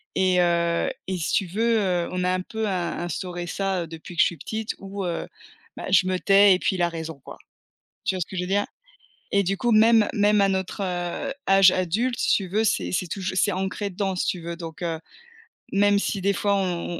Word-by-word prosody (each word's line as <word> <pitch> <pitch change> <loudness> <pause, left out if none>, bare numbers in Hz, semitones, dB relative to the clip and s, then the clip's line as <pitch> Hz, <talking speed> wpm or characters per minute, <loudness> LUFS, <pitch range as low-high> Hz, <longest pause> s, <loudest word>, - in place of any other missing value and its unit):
et 185 -1 +3
heu, 170 -1 +1 0.2
et 190 -1 -2
si 155 - -2
tu 195 - +2
veux, 225 +5 +1
heu, 180 -3 0
on 180 0 -2
a 180 - +1
un 185 - -1
peu 220 +3 -4
in 180 -3 -2
instauré 175 +1 -4
ça 190 -2 -2
depuis 165 +2 -10
que - - +4
je - - +7
suis 170 - -2
petite, 220 +8 -4
où 195 0 -5
heu, 170 -1 -3 0.5
bah, - - -6
je 185 -1 +5
me 185 0 0
tais 195 0 +6
et - - -3
puis 190 - 0
il 180 - -2
a 175 - +3
raison, 160 -3 -6
quoi. - - -10 0.7
Tu - - +1
vois 185 - -3
ce - - -2
que - - -9
je - - 0
veux - - -5
dire? 200 +1 +1 0.7
Et 200 0 +4
du 195 +1 -1
coup 240 +1 0
même 220 0 +5
même 210 0 +3
à 195 - +4
notre, 190 +1 -2
heu, 180 +9 -3 0.2
âge 195 -1 +7
adulte, 215 +8 0
si - - +3
tu 195 -3 -4
veux, 215 +4 +1
c'est 90 - 0
c'est 180 - -1
tou 195 - -5
c'est 185 +2 +1
ancré 190 +2 -3
dedans, 190 0 -2
si 180 - -1
tu 180 - -1
veux. 170 0 -5
Donc 165 0 -8
heu, 165 -2 -2 0.7
même 205 0 +3
si 200 -1 -1
des 200 +1 +2
fois 200 0 0
on 175 -3 -2
185 Hz, 235 wpm, -24 LUFS, 175-200 Hz, 0.7 s, je